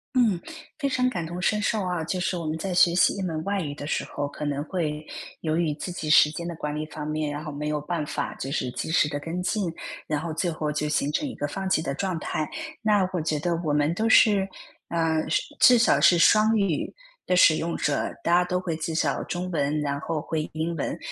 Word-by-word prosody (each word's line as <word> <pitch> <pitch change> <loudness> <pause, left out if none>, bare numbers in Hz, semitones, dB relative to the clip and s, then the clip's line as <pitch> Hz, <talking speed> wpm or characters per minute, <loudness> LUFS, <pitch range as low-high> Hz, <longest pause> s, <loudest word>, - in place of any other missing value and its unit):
嗯， 220 -9 +3 0.4
非 280 - -1
常 255 -1 +1
感 175 -8 -3
同 175 +2 -5
身 210 +3 +1
受 210 -2 0
啊， 180 -3 -1
就 180 +3 -2
是 180 0 -1
我 170 - -4
们 155 +1 -2
在 185 +1 -3
学 175 -1 +5
习 - - +4
一 195 - -4
门 160 -4 -2
外 200 0 -1
语 145 -4 -3
的 145 - -6
时 - - -1
候， 145 - -3
可 145 +1 -6
能 145 0 -1
会 155 -4 -3 0.4
由 160 -1 0
于 165 -3 +1
自 175 +4 -6
己 155 -3 -4
时 150 - +7
间 170 +2 -5
的 170 - -4
管 150 -1 -4
理 155 0 -3
方 150 -1 -7
面， 155 -1 -2
然 145 +2 -5
后 155 - -5
没 150 +1 -4
有 150 -1 -1
办 160 -1 -2
法 - - -3
就 135 - -5
是 125 -4 -2
及 160 - -4
时 160 -3 +3
地 145 -1 -4
跟 170 +4 -4
进， 180 -2 -1 0.4
然 150 -1 0
后 160 -1 -4
最 175 +1 0
后 155 -1 -2
就 150 0 -1
形 145 -1 0
成 290 - -1
一 - - -7
个 145 - -2
放 190 +6 -4
弃 155 - +3
的 140 -4 -3
状 185 -1 -2
态。 155 0 -3 0.3
那 205 -4 +3
我 180 - -1
觉 155 -1 0
得 170 +3 0
我 150 - +1
们 150 +2 +2
都 220 +5 0
是， 200 -3 +5 0.4
呃， 160 -2 0
是 - - +2 0.2
至 250 -1 +8
少 230 - +4
是 175 - +6
双 215 +5 +5
语 190 -7 0 0.3
的 180 - +1
使 155 -3 +7
用 170 +1 -2
者， 145 -2 -1
大 170 - +1
家 180 - +5
都 180 0 -1
会 170 -3 -3
至 160 0 -3
少 - - 0
中 180 +1 -4
文， 150 0 0
然 140 -1 -2
后 160 0 -2
会 155 0 -3
英 165 +2 -2
文， 150 - -3
165 Hz, 270 characters per minute, -25 LUFS, 150-180 Hz, 0.4 s, 至